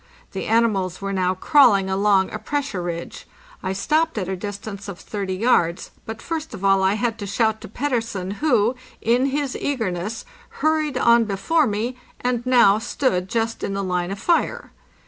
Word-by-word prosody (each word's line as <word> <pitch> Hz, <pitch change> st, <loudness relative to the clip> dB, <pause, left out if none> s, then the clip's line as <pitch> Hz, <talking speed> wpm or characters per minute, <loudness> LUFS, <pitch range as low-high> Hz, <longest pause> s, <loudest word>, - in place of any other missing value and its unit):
The -, -, -4 dB
animals 205 Hz, -6 st, +1 dB
were 195 Hz, 0 st, -3 dB
now 185 Hz, -1 st, +1 dB
crawling 210 Hz, -, +5 dB
along 190 Hz, 0 st, +2 dB
a -, -, -4 dB
pressure 285 Hz, -10 st, -3 dB
ridge. 170 Hz, -1 st, -6 dB, 0.3 s
I 185 Hz, -, -2 dB
stopped 310 Hz, +9 st, +1 dB
at 190 Hz, -4 st, -2 dB
a 190 Hz, -, -2 dB
distance 205 Hz, +1 st, -7 dB
of 200 Hz, -3 st, -6 dB
30 195 Hz, -3 st, -4 dB
yards, 185 Hz, -5 st, +1 dB, 0.2 s
but 225 Hz, 0 st, -7 dB
first 320 Hz, -6 st, -4 dB
of 195 Hz, -1 st, -5 dB
all 195 Hz, 0 st, +4 dB
I 190 Hz, +1 st, +3 dB
had 230 Hz, +1 st, -1 dB
to 200 Hz, -, -5 dB
shout 220 Hz, +2 st, 0 dB
to -, -, -8 dB
Pet 280 Hz, +8 st, -3 dB
tersen, 205 Hz, -6 st, -2 dB
who, 245 Hz, -6 st, +2 dB, 0.2 s
in 245 Hz, +4 st, +2 dB
his 280 Hz, -1 st, -2 dB
eagerness, 220 Hz, -6 st, -3 dB, 0.4 s
hurried 310 Hz, -3 st, +1 dB
on 235 Hz, -1 st, +5 dB
before 265 Hz, +10 st, +1 dB
me, 225 Hz, +4 st, -2 dB, 0.2 s
and 245 Hz, -1 st, -1 dB
now 235 Hz, -5 st, +5 dB
stood 225 Hz, -6 st, -1 dB
just 225 Hz, +1 st, -1 dB
in 195 Hz, -, -2 dB
the 200 Hz, -, -2 dB
line 180 Hz, -1 st, -1 dB
of 195 Hz, -, -4 dB
fire. 340 Hz, -, 0 dB
215 Hz, 180 wpm, -22 LUFS, 190-250 Hz, 0.4 s, crawling